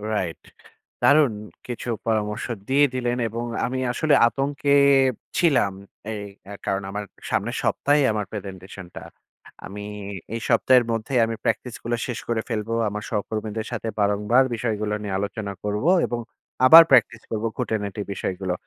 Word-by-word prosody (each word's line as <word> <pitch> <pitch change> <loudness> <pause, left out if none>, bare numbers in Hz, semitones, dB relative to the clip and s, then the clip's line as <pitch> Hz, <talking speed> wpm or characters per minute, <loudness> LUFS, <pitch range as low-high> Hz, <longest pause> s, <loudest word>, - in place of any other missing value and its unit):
Right. 85 -5 -2 0.6
দারুন 145 -5 +5 0.3
কিছু 120 0 -5 0.2
পরামর্শ 105 -2 -1 0.2
দিয়ে 140 +2 +5
দিলেন 125 -1 -1
এবং 115 +2 -4 0.2
আমি 130 +2 -2
আসলে 150 +4 +1
আতঙ্কে 140 +3 -1 0.7
ছিলাম, 140 - +3 0.4
এই 105 -2 -4 0.3
এর 100 - -7
কারণে। 95 0 -1
আমার 105 +1 -4 0.2
সামনের - - -1
সপ্তাহেই 145 0 +2
আমার 105 -1 -2
প্রেজেন্টেশনটা। 95 -3 -8 0.6
আমি 105 +2 -8 0.5
এই 115 - -3
সপ্তাহের 130 -1 +5
মধ্যেই 115 +3 0
আমি 115 0 -3
প্র্যাকটিস 125 -2 -1
গুলো 120 +1 -1
শেষ 125 -4 -4
করে 115 -1 0
ফেলবো। 115 0 -2 0.2
আমার 105 +1 -5
সহকর্মীদের 110 0 -3
সাথে 115 -1 -4
বারংবার 105 +5 +3
বিষয়গুলো 110 -2 -2
নিয়ে 100 -2 -3
আলোচনা 100 0 -4
করব 105 +5 -2 0.2
এবং 120 - -3 0.5
আবার 165 +6 +11
প্র্যাকটিস 130 -3 +4
করবো 110 0 -1
খুঁটি-নাটি 105 -2 -2
বিষয়গুলো। 95 -1 -3
110 Hz, 140 wpm, -23 LUFS, 105-125 Hz, 0.7 s, আবার